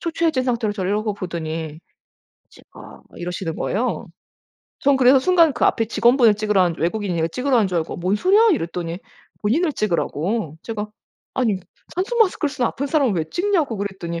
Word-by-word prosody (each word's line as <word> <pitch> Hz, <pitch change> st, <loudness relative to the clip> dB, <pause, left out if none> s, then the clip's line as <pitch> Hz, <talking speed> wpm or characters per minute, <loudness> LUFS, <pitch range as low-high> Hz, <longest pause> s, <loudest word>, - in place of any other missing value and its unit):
초췌해진 330 Hz, -5 st, 0 dB
상태로 235 Hz, -4 st, 0 dB
저를 190 Hz, -2 st, -2 dB
이러고 210 Hz, 0 st, -1 dB
보더니 160 Hz, -4 st, -5 dB, 0.7 s
"찍어." -, -, -17 dB
막 -, -, -13 dB
이러시는 175 Hz, -1 st, -4 dB
거예요. 230 Hz, 0 st, -2 dB, 0.7 s
전 280 Hz, 0 st, +3 dB
그래서 260 Hz, +1 st, +6 dB
순간 335 Hz, +2 st, +4 dB
그 245 Hz, -, 0 dB
앞에 225 Hz, -, +2 dB
직원분을 235 Hz, -1 st, +4 dB
찍으라는 200 Hz, -5 st, +1 dB
줄 160 Hz, -, -7 dB
외국인 185 Hz, +1 st, -1 dB
이거 165 Hz, 0 st, 0 dB
찍으라는 255 Hz, -, 0 dB
하는 210 Hz, -4 st, +2 dB
줄 180 Hz, -2 st, 0 dB
알고 160 Hz, -, -4 dB
"뭔 185 Hz, +4 st, 0 dB
소리야?" 410 Hz, -, +4 dB
이랬더니 170 Hz, -, -3 dB, 0.4 s
본인을 300 Hz, +10 st, +1 dB
찍으라고. 175 Hz, -2 st, -1 dB
제가 215 Hz, -2 st, -4 dB, 0.5 s
아니 225 Hz, -7 st, +1 dB, 0.4 s
산소마스크를 375 Hz, -4 st, +1 dB
쓰는 255 Hz, -4 st, 0 dB
아픈 280 Hz, -, -4 dB
사람을 275 Hz, -7 st, +2 dB
왜 165 Hz, -3 st, 0 dB
찍냐고 350 Hz, -, 0 dB
그랬더니 190 Hz, -4 st, -4 dB
215 Hz, 410 characters per minute, -21 LUFS, 180-275 Hz, 0.7 s, 그래서